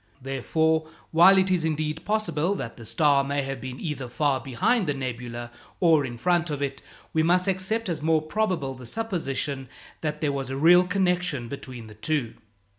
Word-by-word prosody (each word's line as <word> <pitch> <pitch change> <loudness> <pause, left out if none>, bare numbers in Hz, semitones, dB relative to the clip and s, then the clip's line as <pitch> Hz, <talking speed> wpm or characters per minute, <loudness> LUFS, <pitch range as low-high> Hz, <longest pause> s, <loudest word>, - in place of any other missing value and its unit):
Therefore, 160 +4 0 0.2
while 175 +4 +7
it 190 0 +3
is, 180 -3 +2
indeed, 155 0 -2
possible 205 -4 0
that 120 -10 -5
the 115 -2 -11
star 145 0 +3
may 140 0 -1
have 135 -2 -5
been 130 0 -6
either 145 -6 -4
far 140 +1 +1
behind 185 - +1
the 145 - 0
nebula 120 -2 -5 0.3
or 160 -5 +4
in 120 -1 -7
front 175 +4 +1
of 145 -2 -3
it, 140 -1 -3 0.3
we 160 - +3
must 180 +3 +3
accept 195 +4 -1
as 170 -4 -2
more 160 0 +2
probable 175 -6 -1
the 125 -2 -10
supposition 140 - -3 0.3
that 150 -1 -2
there 150 -2 0
was 135 -2 -3
a 135 - -3
real 175 +5 +6
connection 180 -8 0
between 125 -3 -8
the 110 - -12
two. 120 +2 -2
150 Hz, 185 wpm, -26 LUFS, 135-180 Hz, 0.3 s, while